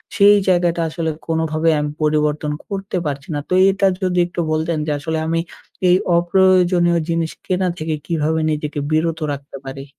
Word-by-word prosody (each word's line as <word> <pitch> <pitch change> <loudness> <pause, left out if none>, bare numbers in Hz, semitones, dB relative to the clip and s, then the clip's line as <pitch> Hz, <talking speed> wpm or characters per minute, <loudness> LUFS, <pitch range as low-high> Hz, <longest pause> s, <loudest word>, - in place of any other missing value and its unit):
সেই 205 0 +7
জায়গাটা 175 -2 +2
আসলে 160 0 -3 0.2
কোনোভাবেই 160 0 +1
আমি 150 0 -2
পরিবর্তন 150 0 +1 0.2
করতে 195 -2 -4
পারছি 140 -2 -4
না। 145 - -1
তো - - 0 0.2
এটা 195 0 +2 0.2
যদি 180 -1 +1
একটু 175 - -7
বলতেন 160 +1 0
যে, 150 - -1
আসলে 160 +1 -3
আমি 165 +1 0 0.5
এই 180 - +6 0.2
অপ্রয়োজনীয় 175 -1 +3
জিনিস 165 -1 0
কেনা 185 0 0
থেকে 155 -1 -2
কীভাবে 160 -1 0
নিজেকে 150 -1 -3
বিরত 160 +1 +1
রাখতে 140 0 -7
পারি? 135 +1 -7
165 Hz, 160 wpm, -19 LUFS, 155-180 Hz, 0.5 s, সেই